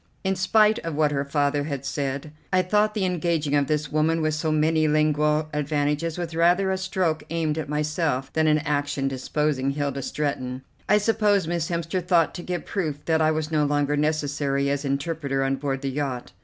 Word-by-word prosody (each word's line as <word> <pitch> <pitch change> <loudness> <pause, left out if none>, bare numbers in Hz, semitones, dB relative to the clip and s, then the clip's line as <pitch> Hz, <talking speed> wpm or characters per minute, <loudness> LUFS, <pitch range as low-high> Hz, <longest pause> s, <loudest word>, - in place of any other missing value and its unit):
In 190 0 +1
spite 215 +4 +3
of 165 -2 -5
what 150 -1 +2
her 140 -1 0
father 145 0 0
had 140 -3 -4
said, 140 +1 -3 0.2
I 185 -1 +3
thought 210 +3 +2
the 200 -3 0
engaging 170 -4 0
of 145 -1 +2
this 150 0 -1
woman 155 +2 +2
with 155 0 +1
so 155 +1 -1
many 155 +1 +2
lingual 150 0 +2
advantages 150 +2 -1
was 170 -2 -4
rather 175 +3 +3
a 190 - 0
stroke 185 -4 -1
aimed 160 -1 -1
at 155 - -5
myself 150 -3 -1
than 160 0 +2
an 155 0 +4
action 145 -1 -1
deposing 135 +1 -1
Hilda 140 -1 -2
Stretton. 130 -2 -3 0.3
I 210 - +6
suppose 210 -4 +2
Miss 170 -1 -1
Hemster 170 +1 -2
thought 175 -2 +3
to 175 - -6
give 180 0 -4
proof 155 -7 -3
that 160 -1 +2
I 155 - +4
was 155 0 -1
no 155 -1 +2
longer 145 0 +1
necessary 145 -2 0
as 140 0 -1
interpreter 140 -1 -1
on 135 0 0
board 135 -1 -3
the 135 - -1
yacht. 135 -3 -3
150 Hz, 195 wpm, -24 LUFS, 145-165 Hz, 0.3 s, I